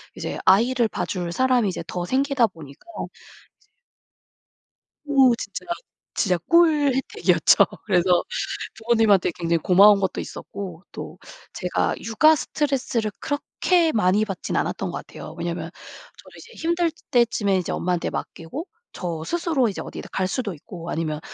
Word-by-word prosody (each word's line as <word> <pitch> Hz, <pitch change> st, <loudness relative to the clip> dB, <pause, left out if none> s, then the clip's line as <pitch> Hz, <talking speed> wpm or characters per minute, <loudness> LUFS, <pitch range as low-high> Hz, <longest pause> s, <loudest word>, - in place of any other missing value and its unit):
이제 -, -, -4 dB
아이를 235 Hz, +5 st, +4 dB
봐줄 180 Hz, -4 st, -3 dB
사람이 250 Hz, +3 st, +2 dB
이제 185 Hz, -, -5 dB
더 175 Hz, -1 st, -3 dB
생기다 270 Hz, +2 st, +2 dB
보니까 155 Hz, -8 st, -13 dB, 2.2 s
오 270 Hz, -4 st, +5 dB
진짜, 200 Hz, -3 st, -6 dB, 0.5 s
진짜 180 Hz, -4 st, +1 dB
꿀 315 Hz, -5 st, +5 dB
혜택이었죠. 265 Hz, -, +3 dB, 0.2 s
그래서 180 Hz, -3 st, +3 dB, 0.5 s
부모님한테 220 Hz, -5 st, +3 dB
굉장히 170 Hz, -1 st, +1 dB
고마운 200 Hz, +4 st, +6 dB
것도 190 Hz, -1 st, -1 dB
있었고, 185 Hz, -4 st, -8 dB
또 -, -, -8 dB, 0.4 s
제가 -, -, -1 dB
육아 310 Hz, +8 st, +4 dB
스트레스를 265 Hz, -8 st, -1 dB
그렇게 325 Hz, +3 st, +1 dB
많이 210 Hz, -2 st, +2 dB
받진 195 Hz, -4 st, -4 dB
않았던 -, -, -1 dB
것 -, -, -4 dB
같아요. -, -, -10 dB
왜냐하면 -, -, -4 dB, 0.5 s
저도 -, -, -16 dB
이제 465 Hz, -, -14 dB
힘들 340 Hz, 0 st, +2 dB, 0.2 s
때쯤에 220 Hz, -5 st, +2 dB
이제 180 Hz, -, -2 dB
엄마한테 180 Hz, -1 st, -1 dB
맡기고 220 Hz, -, -6 dB, 0.2 s
저 170 Hz, -3 st, -4 dB
스스로 330 Hz, -, +1 dB
이제 195 Hz, -, -5 dB
어디를 -, -, -8 dB
갈 185 Hz, -1 st, 0 dB
수도 215 Hz, -1 st, -2 dB
있고 170 Hz, +2 st, -9 dB
아니면 155 Hz, -2 st, -2 dB
215 Hz, 315 characters per minute, -23 LUFS, 180-270 Hz, 2.2 s, 고마운